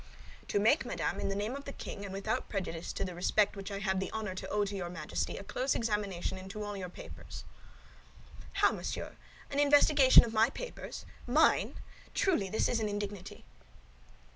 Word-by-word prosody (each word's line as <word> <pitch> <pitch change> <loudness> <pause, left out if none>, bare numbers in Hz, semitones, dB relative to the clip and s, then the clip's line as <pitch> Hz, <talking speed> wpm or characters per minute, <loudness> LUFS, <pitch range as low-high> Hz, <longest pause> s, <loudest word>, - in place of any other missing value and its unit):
"To - - 0
make, 225 +9 +4
madame, - - -2
in - - -1
the 195 - -1
name 210 +4 -2
of 280 0 -7
the 280 - -5
king, 200 - -7
and 200 - -6
without 195 +3 -2
prejudice 175 -4 -3
to - - -2
the 180 - -5
respect 195 +4 +2
which 195 0 -6
I 200 - -4
have 190 -1 0
the 190 - -2
honor 215 -3 -3
to 185 - -6
owe 210 0 +1
to 200 0 -4
your 180 -3 -3
Majesty 165 -3 -3
a - - -6
close 250 +7 -1
examination 205 -5 -1
into 195 +3 -6
all 205 0 -4
your 185 -2 -5
papers." - - -10 1.1
"How, - - +4
monsieur, - - -4 0.4
an 280 - 0
investigation 290 -1 +7
of 225 - -6
my 220 +2 +5
papers—mine! 305 - 0 0.4
Truly, 270 - +2
this 220 - +1
is 240 - +1
an 215 -1 -1
indignity!" 205 -2 -5
205 Hz, 185 wpm, -32 LUFS, 190-230 Hz, 1.1 s, investigation